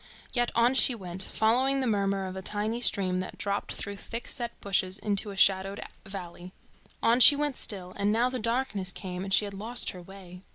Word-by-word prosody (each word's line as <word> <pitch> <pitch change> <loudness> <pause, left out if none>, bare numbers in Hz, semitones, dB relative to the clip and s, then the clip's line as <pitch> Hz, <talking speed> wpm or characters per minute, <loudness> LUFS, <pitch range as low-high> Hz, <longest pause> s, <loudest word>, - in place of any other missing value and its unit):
Yet 240 -1 +1
on 235 +2 +4
she 260 -1 +2
went, 185 -3 -6
following 255 +7 +1
the 265 - 0
murmur 200 -3 0
of 185 0 -6
a 190 - -5
tiny 210 +4 -3
stream 185 -5 +1
that 185 - -6
dropped 200 0 -3
through 200 0 -6
thick 230 +4 -6
set 240 -3 -3
bushes 190 -1 0
into 205 0 -1
a 200 - -8
shadowed 195 +1 +3 0.3
valley. 180 -2 -8 0.5
On 235 +2 +4
she 285 +4 +10
went 290 -2 -1
still, 185 -7 -2
and 200 +1 0
now 230 +3 +2
the 255 0 -3
darkness 230 -5 -2
came, 180 -1 -6
and 195 - -6
she 205 - +5
had 200 - -7
lost 225 +5 -1
her 180 - -10
way. 180 -1 -12
200 Hz, 205 wpm, -28 LUFS, 190-235 Hz, 0.5 s, she